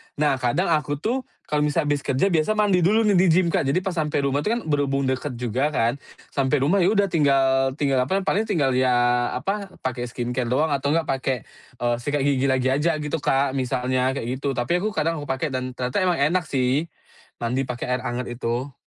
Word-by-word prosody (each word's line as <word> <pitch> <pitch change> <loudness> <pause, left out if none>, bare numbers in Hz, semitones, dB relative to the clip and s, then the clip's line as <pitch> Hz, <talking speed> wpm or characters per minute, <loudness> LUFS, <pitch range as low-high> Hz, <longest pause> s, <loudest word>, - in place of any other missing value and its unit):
Nah, 145 -3 +1
kadang 165 +9 0
aku 150 -2 +1
tuh, 235 - -2 0.2
kalau 150 - 0
misalnya 150 0 +1
habis 145 - +1
kerja 135 +11 +1
biasa 160 +3 +2
mandi 205 -4 +3
dulu 210 +6 +3
nih 210 -2 +3
di 185 - +4
gym, 175 +2 +3
Kak. - - +1
Jadi, 140 +7 +2
pas 185 -1 -3
sampai 150 -3 0
rumah 140 +1 +1
itu 215 - 0
kan 240 - -3
berhubung 140 -2 0
dekat 130 0 -2
juga 125 +3 -1
kan, 120 0 0 0.3
sampai 135 0 +1
rumah 180 +8 +3
ya 185 +2 +3
udah 200 -1 +3
tinggal 135 -3 +2
tinggal 140 -3 +1
apa, 195 +5 0
paling 210 +3 0
tinggal 155 -10 +1
ya 130 0 +2 0.4
apa, 195 +10 -3 0.2
pakai 125 -1 -3
skincare 120 +1 -3
doang, 145 +6 +1
atau 140 0 0
enggak 165 -1 0
pakai, 135 0 -1 0.4
eee, 120 0 +1
sikat 145 +3 -1
gigi 140 -1 +2
lagi 130 -1 +1
aja 150 +5 +1
gitu, 150 +2 -2
Kak, 135 -1 +1
misalnya 130 0 0
kayak 130 0 -3
gitu. 140 -1 -2
Tapi, 125 +8 0
aku 215 +2 -3
kadang 160 +1 0
aku 145 - -7
pakai 135 +3 -2
dan 130 0 -3
ternyata 125 0 -2
emang 180 -4 +1
enak 170 +6 +2
sih 135 +4 0 0.5
mandi 125 +3 0
pakai 125 0 -4
air - - -8
hangat 120 +1 -3
itu. 120 +3 -3
140 Hz, 215 wpm, -23 LUFS, 130-165 Hz, 0.5 s, di